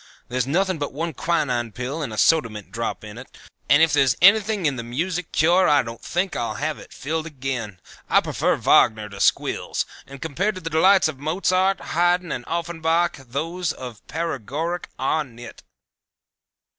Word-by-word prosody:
There's 125 0 -1
nothing 185 +3 +1
but 145 -2 -3
one 165 +3 -3
quinine 130 -8 -1
pill 130 +6 -4
and 140 - -4
a 110 - -6
soda 155 +1 +4
mint 105 -2 -10
drop 115 -1 -4
in 105 +2 -9
it, 125 - -10 0.4
and 145 +4 +6
if 165 -2 +3
there's 135 -4 +4
anything 200 0 +5
in 145 -3 +2
the 120 - -4
music 165 +9 -3
cure 175 +3 +4
I 145 -2 +4
don't 115 0 -8
think 180 +1 -2
I'll 120 - -2
have 155 +1 -3
it - - -14
filled 160 +3 -3
again. 130 - -5 0.3
I - - +6
prefer - - 0
Wagner 110 -1 +3
to 100 -1 -10
squills, - - +1 0.2
and 140 0 -10
compared 180 +9 -1
to 185 - -7
the 165 0 -5
delights 185 +3 +5
of 150 -4 -6
Mozart, 185 +5 +1
Hayden 175 0 +2
and 120 - -4
Offenbach 170 0 0
those 165 +6 -2
of 125 -4 -9
paregoric 165 +2 -3
are 155 +4 0
nit." 120 -3 -12
155 Hz, 175 wpm, -23 LUFS, 125-170 Hz, 0.4 s, and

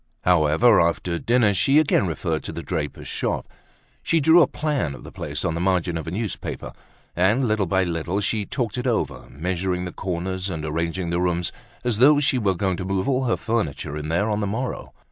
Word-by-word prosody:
However, 90 +6 +4
after 85 +1 0
dinner, 120 -3 +3
she 135 - +3
again 140 -10 +3
referred 80 -1 -2
to - - -4
the 85 - -6
draper's 75 -5 -4
shop. - - -2 0.5
She 165 - +2
drew 160 +4 +6
a - - +5
plan 145 - -2
of - - -12
the - - -10
place - - -4
on - - 0
the 85 - -2
margin 90 -2 +1
of 80 0 -4
a - - -1
newspaper. 105 +4 -4 0.4
And, 105 +9 +3
little 105 -3 +1
by 95 +2 +2
little, 85 +2 -2
she 105 0 -1
talked 120 -2 -2
it 125 - -2
over, 120 -3 -1
measuring 90 +3 -2
the 90 - -5
corners, 95 +1 -3
and 80 -4 -4
arranging 85 +3 -2
the 85 +1 0
rooms, 90 -1 0 0.3
as 120 -3 0
though 145 +4 +7
she 130 -3 +2
were 100 -4 +1
going 95 -1 0
to - - -4
move 95 0 -1
all 135 -1 +1
her 120 - +1
furniture 90 - -2
in 75 0 -4
there 85 +6 +1
on 105 -1 0
the 100 - -1
morrow. 120 +6 -4
95 Hz, 210 wpm, -23 LUFS, 85-115 Hz, 0.5 s, though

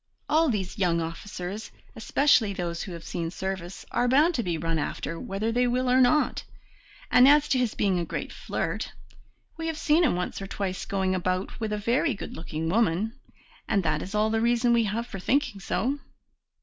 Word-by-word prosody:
All 315 +1 +3
these 200 -3 -2
young 175 -3 +2
officers, 180 +4 -5 0.3
especially 225 -2 +3
those 170 -3 -3
who 190 - -6
have 170 -1 -8
seen 165 -1 -3
service, 190 0 -5
are 245 - +1
bound 295 +7 +4
to 250 - 0
be 175 -6 -2
run 165 0 -1
after, 165 +2 -3
whether 205 +4 -2
they 245 +2 +2
will 250 +1 0
or 255 +1 +5
not. 255 +4 +3 0.7
And 250 +1 +7
as 295 +1 +6
to 260 - +3
his 245 -3 0
being 190 -3 +1
a - - -1
great - - -5
flirt, - - -3 0.6
we 325 0 -3
have 320 -1 -2
seen 315 +2 +3
him 300 - +3
once 180 +2 -3
or 195 - -5
twice 190 -2 -3
going 190 -1 0
about 185 +1 -2
with 220 -2 -2
a 210 - 0
very 230 +4 +1
good - - -7
looking 160 0 -4
woman, 215 +2 +1 0.5
and 200 -3 +1
that 155 -1 0
is 195 +3 -6
all 215 +1 +2
the 225 0 +1
reason 240 +1 +3
we 230 -1 +3
have 220 +3 -2
for 195 -5 -7
thinking 250 0 0
so." 265 +8 -1
210 Hz, 200 wpm, -27 LUFS, 180-245 Hz, 0.7 s, And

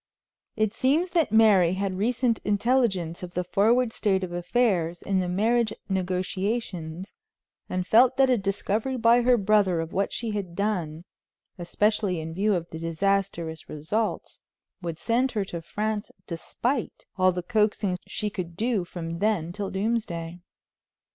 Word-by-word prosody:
It 215 -1 0
seems 305 +10 +1
that 330 - +2
Mary 205 -6 +5
had 195 0 -1
recent 230 +3 +1
intelligence 205 -6 +1
of 180 -1 -8
the 180 - 0
forward 225 +6 +2
state 195 -3 +1
of 180 - -4
affairs 175 -2 0
in 195 -1 +1
the 180 -1 -1
marriage 220 +4 +2 0.2
negotiations, 185 -1 -2 0.6
and 185 0 -2
felt 245 +6 +5
that 270 0 +5
a 255 - +4
discovery 210 +5 -1
by 235 +1 +5
her 245 0 +4
brother 200 -4 +3
of 165 +1 -4
what 195 +1 0
she 230 -2 -3
had 195 -5 -4
done, 175 -6 -2 0.5
especially 205 +1 0
in 160 +1 -6
view 200 +3 +2
of 170 -1 -3
the 160 - -6
disastrous 170 -1 -1
results, 205 +9 -3 0.4
would 170 -2 -4
send 245 +7 +1
her 210 -3 -1
to 170 -3 -6
France 210 +4 -3 0.2
despite 235 +9 -3
all 185 -1 +4
the 180 -1 -4
coaxing 210 -2 +1
she 210 -1 -3
could 175 -3 -6
do 225 -4 0
from 170 -1 -6
then 190 -5 0
till 200 0 -4
doomsday. 190 -5 -2
200 Hz, 150 wpm, -26 LUFS, 175-225 Hz, 0.6 s, Mary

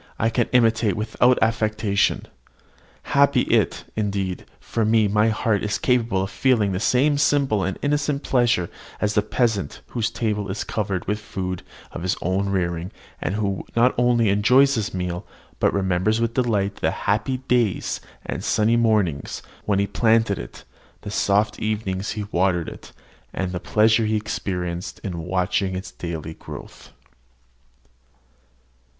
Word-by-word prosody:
I 115 +1 +1
can 120 0 +1
imitate 115 -4 +3
without 120 +3 +2
affectation. 110 -2 +1 0.9
Happy 140 0 +5
is - - +4
it, - - -5
indeed, 100 -3 -2
for 115 - -2
me 110 0 +4
that 100 - -1
my 105 +1 +4
heart 110 -1 0
is 105 0 0
capable 115 -6 +1
of 95 - -5
feeling 115 -7 +2
the 90 - -1
same 140 +7 +2
simple 140 -8 +2
and 95 - -2
innocent 145 0 0
pleasure 120 -8 +2 0.3
as 105 0 0
the 105 - +3
peasant 105 - -1
whose 115 -2 -1
table 105 -3 -2
is 95 - -3
covered 100 -4 -2
with 105 +1 -1
food 90 -3 -4 0.3
of - - -6
his 90 +1 0
own 95 +3 0
rearing, 85 -2 -1 0.3
and 95 - -1
who 100 -3 -1
not 120 +2 +4
only 120 -3 +3
enjoys 125 +8 +5
his 110 -4 -1
meal, 90 -1 -3 0.4
but - - +3
remembers 95 +3 +1
with 115 0 0
delight 105 -6 0
the - - +1 0.2
happy 120 +6 +1
days 125 -6 0 0.2
and - - -4
sunny 110 +2 +2
mornings 105 -11 +1 0.2
when 100 -2 +1
he 100 - +2
planted 110 0 +2
it, - - -9 0.4
the 100 - -7
soft 105 +1 +1
evenings 105 -3 -2
when 105 -1 -3
he - - -16
watered 90 -2 +2
it, - - -10 0.4
and 95 -1 -2
the 90 - -3
pleasure 110 +3 +3
he 110 - +1
experienced 90 -4 -3
in 90 -4 -4
watching 90 +2 0
its 95 - -6
daily 80 -2 -6
growth. - - -11
105 Hz, 155 wpm, -23 LUFS, 95-115 Hz, 0.9 s, Happy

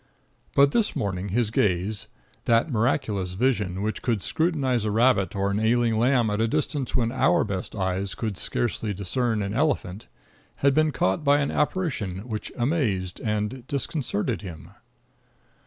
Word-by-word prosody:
But 140 0 +6
this 225 +3 +1
morning 95 -1 -2
his 110 +2 0
gaze 100 +2 +1 0.4
that 115 +6 +3
miraculous 105 -6 0
vision 100 -5 0
which 110 +1 -2
could 115 -6 -1
scrutinize 140 -8 +1
a 110 - 0
rabbit 110 -3 +2
or 100 0 0
an 100 - 0
ailing 115 +1 +2
lamb 120 -2 +3
at 105 +1 0
a 115 - +3
distance 145 0 -2
when 115 -2 +1
our 130 +2 +3
best 100 -4 -4
eyes 95 0 -2
would 110 -5 -2
hardly 110 -3 -1
discern 110 +3 -1
an 100 +1 -3
elephant 115 - -1 0.6
had 140 - +5
been 155 +2 +3
caught 95 0 0
by 145 0 +5
an 140 - 0
apparition 125 - -1
which 110 -3 -5
amazed 120 - 0
and 110 +4 -2
disconcerted 140 -5 -2
him. 85 -8 -9
110 Hz, 155 wpm, -25 LUFS, 100-130 Hz, 0.6 s, But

